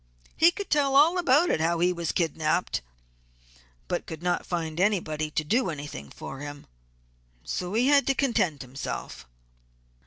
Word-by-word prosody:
He 330 - +6
could 395 +2 -6
tell 280 -3 +2
all 325 +6 +5
about 300 - +3
how 165 +2 +1
he 180 +2 +2
was 170 -2 -2
kidnapped, 160 - 0 1.1
but - - -3
could 160 +1 -8
not 180 0 -1
find 165 -2 -3
anybody 165 -6 0
to 155 - -1
do 230 - +1
anything 145 - -7
for 135 - -8
him, 145 0 -8 0.8
so 180 +3 -3
he 240 +3 +3
had 285 -1 +4
to 275 - +2
content 190 - 0
himself. 125 - -6
175 Hz, 150 wpm, -27 LUFS, -, 1.1 s, He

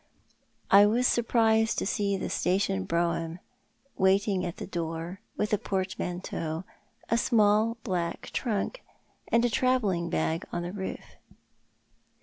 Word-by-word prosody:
I 200 +1 +8
was 240 +4 +2
surprised 225 -2 +3
to - - 0
find 200 -1 0
the - - -2
station 180 - 0
brougham 170 - -1 0.6
waiting 190 0 +2
at 175 -2 -4
tho - - -5
door, 165 +2 -4 0.2
with 210 0 -1
a 210 - +3
portmanteau, 180 -3 -3 0.5
a 230 - +4
small 220 0 +3
black 175 -4 -3
trunk, 235 - -2 0.5
and 230 +1 +3
a - - +2
travelling 210 -9 +1
bag 165 0 0
on 175 - -2
the 175 - -4
roof. 190 -2 -6
195 Hz, 130 wpm, -28 LUFS, 175-220 Hz, 0.6 s, I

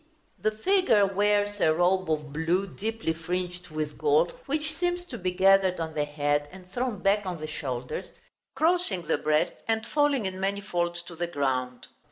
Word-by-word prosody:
The - - +2
figure 225 - +3
wears 205 +1 +1
a 155 - +5
robe 180 +2 +2
of 150 -2 -2
blue, 165 +5 +1
deeply 215 -2 -3
fringed 180 +2 -4
with 155 -1 -4
gold, 450 +3 +3 0.2
which 305 +2 -1
seems 355 0 -1
to 250 - -7
be 185 - 0
gathered 190 0 +4
on 160 -1 -3
the 150 -1 0
head 145 0 0
and 185 -1 -13
thrown 240 -4 -2
back 205 +1 +3
on 180 -2 -3
the 155 - -4
shoulders, 130 -5 -4 0.5
crossing 325 - +2
the - - +1
breast, 155 +3 +2
and 225 0 0
falling 290 -3 +2
in 190 0 -3
many 195 +1 0
folds 175 -3 -2
to 170 -1 -10
the 175 +1 -2
ground. 130 -5 -2
185 Hz, 180 wpm, -27 LUFS, 160-215 Hz, 0.5 s, a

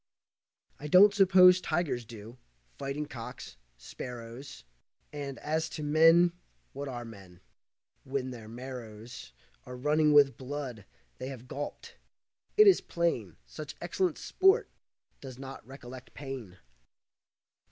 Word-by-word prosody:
I 150 - -6
don't 195 +6 +7
suppose 185 -2 +7
tigers 155 -8 -1
do, 115 +2 -11 0.4
fighting 140 +2 -3
cocks, 120 - -9 0.2
sparrows, 120 - -9 0.5
And, 140 -2 -5
as 160 +2 -2
to 155 - -5
men 165 +3 +5 0.4
what 140 +1 -5
are 120 -2 -6
men, 100 -6 -13 0.6
when 130 -1 -3
their 115 -3 -9
marrows 120 - -9 0.3
Are 125 0 -9
running 150 +3 +3
with 140 -4 +5
blood 130 -5 -6 0.3
they 130 - -5
have 130 -2 -8
gulped; 145 +3 -7 0.6
it 425 - +9
is 395 -2 +6
plain 145 - -2
Such 150 -2 -8
excellent 175 -1 -1
sport 385 +3 +3 0.5
does 130 -3 -9
not 135 0 -9
recollect 130 -1 -11
pain. 130 -10 -7
135 Hz, 120 wpm, -30 LUFS, 120-155 Hz, 0.6 s, it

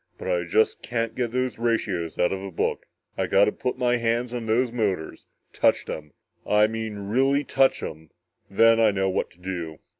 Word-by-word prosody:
But - - -6
I - - 0
just 445 0 +1
can't 115 -1 -2
get 125 -2 -1
those 125 -1 -2
ratios 100 -8 -1
out 90 - +2
of 95 - -4
a 100 - -6
book. 90 - -2 0.3
I - - +1
gotta 100 +2 +4
put 125 +3 -3
my 125 -1 +2
hands 120 +1 -1
on 120 -2 -4
those 120 +2 +2
motors 100 -9 -2 0.3
touch - - +2
'em 75 -2 -7 0.3
I 105 0 +4
mean 110 -1 -4
really 135 +5 +2
touch 135 -1 +2
'em 80 0 -7 0.4
then 115 +3 +5
I 110 -1 +5
know 95 -1 0
what - - -1
to 85 - -24
do!" 85 -4 -5
115 Hz, 190 wpm, -25 LUFS, 95-125 Hz, 0.4 s, then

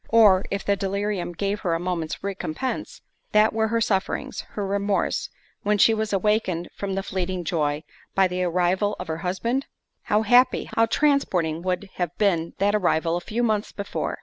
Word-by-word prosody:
Or, 210 -5 +6
if 200 - -3
the 200 - +3
delirium 200 -1 -2
gave 200 +4 -2
her 170 -3 0
a - - -1
moment's 170 -3 -3
recompence, 200 +5 -4 0.3
what 215 +1 +5
were 220 0 +1
her 230 +1 +1
sufferings, 195 -4 -1
her 205 - -2
remorse, 200 0 0 0.3
when 210 0 +1
she 225 +3 +6
was 220 -1 -1
awakened 195 -4 0
from 195 -1 -3
the 195 - -2
fleeting 185 -2 -3
joy, 150 -2 -1 0.3
by 195 -1 +5
the 180 0 -3
arrival 180 +4 +1
of - - -5
her 160 0 -2
husband? 230 +10 -1 0.4
How 210 +1 +2
happy, 245 +4 +4
how 225 0 +4
transporting 190 - +1
would 185 +2 -2
have 175 -3 -2
been 170 -6 +1
that 205 +1 +2
arrival 170 -4 +2
a 175 - -2
few 225 +7 -2
months 215 -2 0
before! 200 -1 -4
195 Hz, 175 wpm, -24 LUFS, 180-210 Hz, 0.4 s, Or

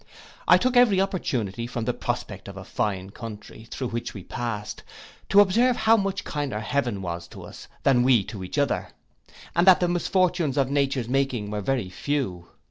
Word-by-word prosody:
I - - +8
took 255 0 0
every 235 -6 +5
opportunity, 120 - -1
from 120 -2 -4
the - - 0
prospect - - -4
of - - -9
a - - -7
fine 95 -2 -2
country, 110 0 -9
through 130 -3 -4
which 115 0 -4
we 95 - -7
passed, 110 -3 -5 0.5
to 200 - +7
observe 235 +6 +3
how 225 0 +4
much 195 -2 -1
kinder 145 -7 -3
heaven 115 -3 -1
was 85 -1 -5
to - - -11
us, - - -11 0.2
than 130 -3 +4
we 125 -4 +4
to 95 -1 -7
each 90 - -6
other, 145 -1 +1 0.7
and 170 +2 +3
that 185 - +8
the 180 - +2
misfortunes 175 -4 +1
of 135 -1 +1
nature's 135 -4 0
making 125 -5 -1
were 105 -1 -2
very 115 -4 -1
few. 95 -7 -3
130 Hz, 185 wpm, -25 LUFS, 105-175 Hz, 0.7 s, I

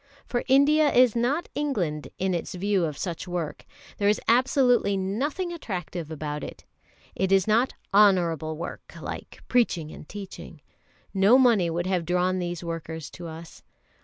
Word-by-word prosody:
For 240 - -2
India 290 +3 +5
is 245 -2 +5
not 260 +8 0
England 185 - -2
in 190 0 0
its 170 +1 -3
view 195 -1 +1
of 150 -3 -4
such 175 0 -4
work. 175 -4 -4 0.3
There 200 0 +3
is 210 - +2
absolutely 245 -4 +3
nothing 275 - -2
attractive 180 - -5
about 150 -2 -4
it. - - -9 0.5
It 190 0 -1
is 195 -1 +4
not 230 +4 +2 0.2
"honourable 170 -6 +3
work," 170 - -8
like - - -8
preaching 175 -11 +1
and - - -12
teaching. 200 -2 -9 0.5
No 200 +5 +6
money 230 -9 +4
would 170 +1 -2
have 185 -3 0
drawn 180 +1 +1
these 175 -1 -4
workers 160 -2 -6
to 175 - -8
us. 165 +1 -10
190 Hz, 155 wpm, -26 LUFS, 170-240 Hz, 0.5 s, No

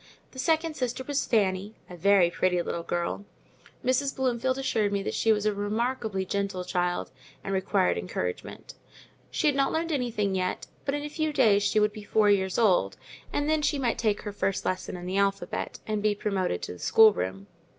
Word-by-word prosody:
The 260 - -10
second 320 +3 +1
sister 250 -1 -2
was 280 +1 -1
Fanny, 200 -1 +1
a 180 - -9
very 180 0 +4
pretty 180 0 +1
little 170 - -3
girl; 175 +3 -2 0.6
Mrs. 265 +2 +1
Bloomfield 260 0 0
assured 220 -6 0
me 200 -1 -1
she 225 - +2
was 210 -1 +1
a 215 - +2
remarkably 210 -1 -2
gentle 195 -1 -2
child, 180 -1 -1 0.3
and 195 - -3
required 190 - +1
encouragement: 90 0 -5 0.6
she - - -2
had 295 -2 +4
not 275 0 +2
learned 330 +1 -1
anything 235 -8 0
yet; 185 -1 -2 0.2
but 280 - 0
in 290 - -3
a - - -3
few 310 +1 -2
days, 210 -8 +4
she 205 +1 +2
would 210 0 +2
be 215 - -8
four 210 0 +3
years 190 -2 +1
old, 185 - +3 0.3
and 290 0 -1
then 310 0 +2
she 295 0 +1
might 250 -4 0
take 215 -3 0
her 205 -1 -5
first 195 -1 -1
lesson 185 0 -2
in 175 - -8
the 185 +2 -2
alphabet, 200 0 -1
and 215 -1 -2
be 210 0 +2
promoted 190 - -1
to - - -4
the 90 - -13
schoolroom. 100 - +4
205 Hz, 190 wpm, -27 LUFS, 190-255 Hz, 0.6 s, very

